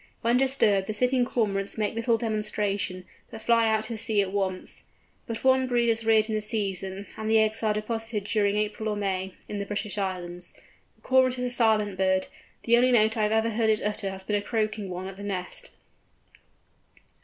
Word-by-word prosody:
When 235 +1 +3
disturbed 250 -7 +2
the 215 - -3
sitting 250 +2 +2
Cormorants 200 -5 -1
make 215 -1 0
little 230 +1 +1
demonstration, 210 -4 -2 0.2
but 225 - -9
fly 230 -1 +4
out 220 -1 +1
to 225 0 -4
sea 220 -1 0
at 190 - -5
once. 190 -2 -3 0.5
But 230 -1 -4
one 260 0 +4
brood 240 -1 +2
is 225 0 +1
reared 220 -1 +4
in 220 - -3
the 215 - 0
season, 200 -2 -2
and 220 0 -3
the 225 - +5
eggs 220 0 +2
are 220 -1 +2
deposited 220 0 -3
during 205 0 +1
April 210 +1 -1
or 210 - -1
May, 190 -2 -2
in 205 - -4
the 200 - -3
British 205 0 -3
Islands. 180 -2 -3 0.4
The - - -33
Cormorant 260 -1 +3
is 250 0 -2
a - - +3
silent 215 -5 +2
bird: 190 0 +2 0.4
the 235 0 +4
only 250 +1 +4
note 220 -1 +4
I 220 - -1
have 210 0 +1
ever 220 +1 +2
heard 220 0 +1
it 215 -1 +1
utter 210 -1 -2
has 190 0 -7
been 210 +2 -1
a 205 - +1
croaking 215 -2 -2
one 180 +1 -5
at 190 0 -8
the 200 - -8
nest. 185 -3 -5
215 Hz, 205 wpm, -27 LUFS, 200-230 Hz, 0.5 s, the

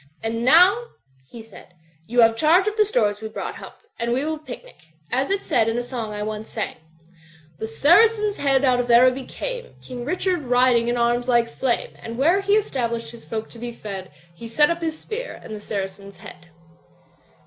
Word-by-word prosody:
"And 230 +1 -2
now," 365 - +6 0.4
he 230 -2 -10
said, 195 -4 -15 0.3
"you 240 +1 +3
have 225 0 +5
charge 335 - +4
of 425 - -1
the 430 -1 +4
stores 210 - 0
we 220 - -4
brought. 215 - -6
Hump, - - -11 0.2
and 235 +1 -1
we 260 +4 0
will 315 0 -3
picnic. 305 - -12 0.2
As 265 +2 0
it 395 0 -1
said 225 -2 +2
in 225 - -1
a 245 - -1
song 240 -3 -5
I 210 0 -4
once 215 0 -5
sang, 215 - -4 0.8
"The 220 - -3
Saracen's 415 - +4
Head 275 -1 +2
out 250 -1 +3
of 245 0 -2
Araby 255 +2 +5
came, - - -6
King 245 -1 -8
Richard 360 +4 -1
riding 245 -2 +3
in 240 0 0
arms 240 +1 +1
like 240 -2 +3
flame. 240 +1 -2
And 230 0 -7
where 335 +9 +3
he 400 +1 +1
established 240 - -1
his 235 -1 -12
folk 220 -1 -4
to 235 - -12
be 240 +1 -5
fed 195 -5 -7 0.2
He 230 +7 -10
set 295 +7 +3
up 340 0 -3
his 320 -1 -2
spear, 475 +7 -6
and 220 - -8
the - - -7
Saracen's 200 -1 -6
Head." 170 - -13
245 Hz, 200 wpm, -22 LUFS, 225-320 Hz, 0.8 s, now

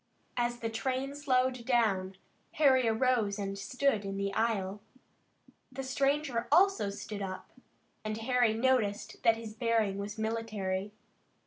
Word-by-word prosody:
As 240 0 -1
the 225 - -1
train 260 +4 -2
slowed 255 -3 +1
down, 210 -6 +1 0.4
Harry 260 -5 +4
arose 225 -3 +2
and 195 -1 -3
stood 235 +3 0
in 195 0 -4
the 200 0 -2
aisle. 205 -3 0 0.9
The 270 +1 -5
stranger 275 -1 0
also 390 - +4
stood 200 +1 -6
up, 185 -1 -6 0.5
and 215 0 -3
Harry 240 -1 +2
noticed 225 -4 0
that 225 -1 +4
his 225 -1 -7
bearing 220 -3 +1
was 205 +2 -5
military. 215 -3 -2
225 Hz, 130 wpm, -31 LUFS, 205-255 Hz, 0.9 s, Harry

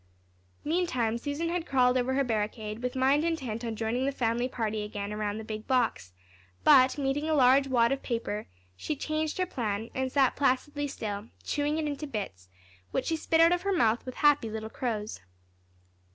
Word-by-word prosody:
Meantime 255 -9 0
Susan 290 +6 -2
had 350 0 -2
crawled 250 -2 +3
over 255 +1 +1
her 275 - +3
barricade, 215 -1 -3
with 250 +1 -3
mind 270 +3 +3
intent 265 -9 -2
on 230 -1 -3
joining 235 +4 -1
the - - +1
family 240 -1 0
party 220 -3 -2
again 210 0 -5
around 210 0 -2
the 220 - -6
big 215 0 -6
box, 245 - 0 0.5
but, 255 - +6
meeting 285 +2 -1
a 315 - +3
large 270 0 +5
wad 240 -2 +3
of 275 - -1
paper, 230 -3 -3 0.3
she 295 - -3
changed 310 +2 -2
her 370 - +1
plan, 225 - -3
and 260 0 -2
sat 270 -2 +3
placidly 285 +2 0
still, 210 -5 -5 0.2
chewing 295 +1 -1
it 315 - -1
into 295 +1 -3
bits, 145 - -6 0.4
which - - -2
she 325 - 0
spit 325 +1 +1
out 330 +1 +7
of 355 0 +1
her 395 - -1
mouth 235 - +2
with 255 - -7
happy 290 -6 +3
little 220 0 -5
crows. 220 - -3
255 Hz, 185 wpm, -29 LUFS, 220-290 Hz, 0.5 s, out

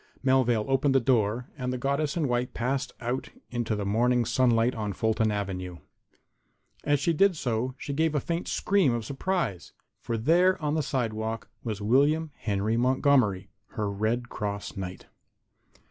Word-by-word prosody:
Melvale 125 -5 +3
opened 135 +1 +2
the - - +6
door 120 -1 +1
and 125 -3 -3
the 125 - -2
goddess 140 +4 -1
in 155 -4 +1
white 125 +1 -1
passed 130 +2 -1
out 120 +2 -3 0.2
into 120 -3 -1
the 105 -1 -3
morning 120 +4 +2
sunlight 120 0 +3
on 105 -3 -3
Fulton 110 +2 +1
avenue. 95 -3 -3 1.1
And 145 - +1
as 145 - +3
she 165 +5 +1
did 190 +2 +3
so 125 0 -1
she 140 - -5
gave 160 +1 +1
a - - +3
faint 170 +4 -3
scream 195 -11 +2
of 115 -2 -4
surprise. 135 - -2 0.3
For 115 - -3
there, 175 +10 +3
on 150 -2 -1
the 160 - +1
sidewalk, 115 -5 -3
was 110 -4 -4
William 145 +7 +3
Henry 105 +1 -1
Montgomery, 125 -6 +2 0.2
her 105 -1 -2
Red 110 +5 -1
Cross 100 -3 -4
Knight. 95 -1 -6
125 Hz, 160 wpm, -27 LUFS, 110-140 Hz, 1.1 s, the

